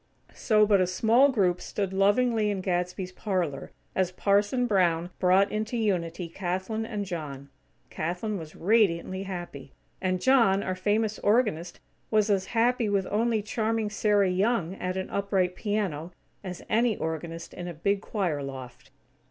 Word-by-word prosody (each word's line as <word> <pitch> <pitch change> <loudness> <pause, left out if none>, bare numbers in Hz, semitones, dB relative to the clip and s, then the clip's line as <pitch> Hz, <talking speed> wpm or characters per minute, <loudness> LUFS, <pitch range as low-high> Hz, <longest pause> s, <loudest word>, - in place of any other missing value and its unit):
So 215 -2 +3
but 200 -2 +4
a 185 - +2
small 230 +9 +4
group 185 -8 +1
stood 195 -2 -3
lovingly 210 +3 +2
in 200 -2 -2
Gadsby's 180 0 -2
parlor, 180 -8 -2 0.2
as 185 -1 0
Parson 205 +6 +1
Brown 175 -5 +1
brought 190 +2 +4
into 220 +3 -2
unity 180 -5 -1
Kathlyn 190 +6 -3
and 210 -3 -3
John. 145 -6 -6 0.4
Kathlyn 180 +5 -3
was 155 -2 -10
radiantly 190 -2 +2
happy; 175 -8 -7 0.3
and 185 -1 0
John, 230 -5 +4
our 185 - -2
famous 210 +3 0
organist, 205 -6 +1 0.3
was 215 -1 +2
as 190 -2 +1
happy 235 -1 +2
with 200 -2 +1
only 220 0 +1
charming 220 0 -1
Sarah 205 -3 +2
Young 190 -2 +1
at 185 +1 -3
an 190 - -3
upright 195 -2 0
piano, 185 -6 -2 0.3
as 180 -2 -7
any 230 -1 +2
organist 165 +1 -5
in 175 -1 -6
a 175 - -5
big 200 +5 0
choir 180 -10 -2
loft. 130 -1 -8
195 Hz, 150 wpm, -27 LUFS, 175-215 Hz, 0.4 s, but